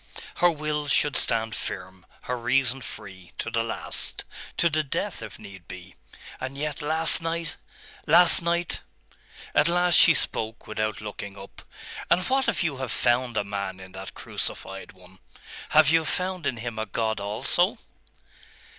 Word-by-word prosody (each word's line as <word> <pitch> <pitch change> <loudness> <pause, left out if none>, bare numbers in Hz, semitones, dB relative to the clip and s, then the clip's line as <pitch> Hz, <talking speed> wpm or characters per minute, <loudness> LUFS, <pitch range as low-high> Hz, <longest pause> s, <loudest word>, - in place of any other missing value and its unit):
Her 175 - +6
will 150 -2 -2
should 145 -1 +2
stand 115 -1 +1
firm, 95 -4 -6
her 125 - -2
reason 130 +1 +1
free, 95 -6 -9
to 115 - -3
the 115 -1 +1
last 115 0 -4 0.3
to 170 - +4
the 155 -1 +2
death 155 - -3
if 110 -2 -6
need 95 -4 -12
be.... 90 +1 -9 0.5
And 130 +1 -5
yet 150 0 -2
last 160 +2 +3
night! 165 -2 -2 0.5
last 175 +3 +7
night! 170 0 0 0.7
At 150 - +5
last 175 +1 +3
she 160 0 +8
spoke, 110 -3 -2
without 110 -1 -2
looking 100 -1 -6
up. 95 0 -11 0.5
'And 180 - +3
what 265 0 +2
if 195 -6 +1
you 155 -5 -1
have 130 -3 -3
found 120 -1 +2
a - - +2
man 100 -2 -4
in 95 0 -11
that 95 +1 -8
crucified - - -4
one? 95 0 -18 0.5
Have 155 -1 +6
you 165 0 +5
found 180 0 -2
in 130 -4 -1
him 110 -1 -4
a 110 - -2
God 110 +1 -1
also? 125 - +1
125 Hz, 160 wpm, -26 LUFS, 105-160 Hz, 0.7 s, she